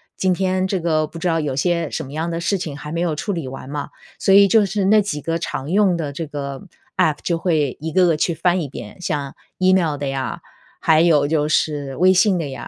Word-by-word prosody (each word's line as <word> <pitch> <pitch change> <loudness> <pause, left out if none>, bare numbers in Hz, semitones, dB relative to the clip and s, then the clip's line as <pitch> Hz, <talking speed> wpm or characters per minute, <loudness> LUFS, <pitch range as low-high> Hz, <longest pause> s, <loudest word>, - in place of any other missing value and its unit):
今 185 -1 +1
天 185 0 0
这 190 -1 -1
个 155 -2 +1
不 165 +2 -10
知 180 - -1
道 165 -1 +1
有 145 -3 -2
些 170 +2 0
什 160 - -4
么 135 - -10
样 165 +2 -2
的 165 - -3
事 195 +3 0
情 150 -5 -5
还 150 +2 -7
没 170 - -1
有 170 -3 0
处 200 +7 -3
理 155 -7 -4
完 135 0 -9
嘛， 145 0 -4 0.3
所 195 - +3
以 200 0 +8
就 210 +1 +4
是 195 0 -1
那 210 +1 +5
几 185 -7 -3
个 165 +3 -2
常 150 -3 -5
用 190 -2 +3
的 145 -4 -4
这 165 +3 -4
个 140 -2 -6 0.3
App 150 -2 +2
就 170 -1 -1
会 155 -6 0
一 160 0 -4
个 180 +1 +4
个 165 - +3
去 165 +2 0
翻 175 +2 +1
一 145 - -5
遍， 180 - -10
像 145 -5 -3 0.2
email 185 -5 +2
的 140 -1 -4
呀， 135 -1 -3 0.4
还 160 0 +4
有 150 -4 +4
就 150 -1 0
是 145 -3 0
微 185 +2 +5
信 185 0 +3
的 160 -4 -3
呀， 135 - -7
165 Hz, 295 characters per minute, -20 LUFS, 145-180 Hz, 0.4 s, 以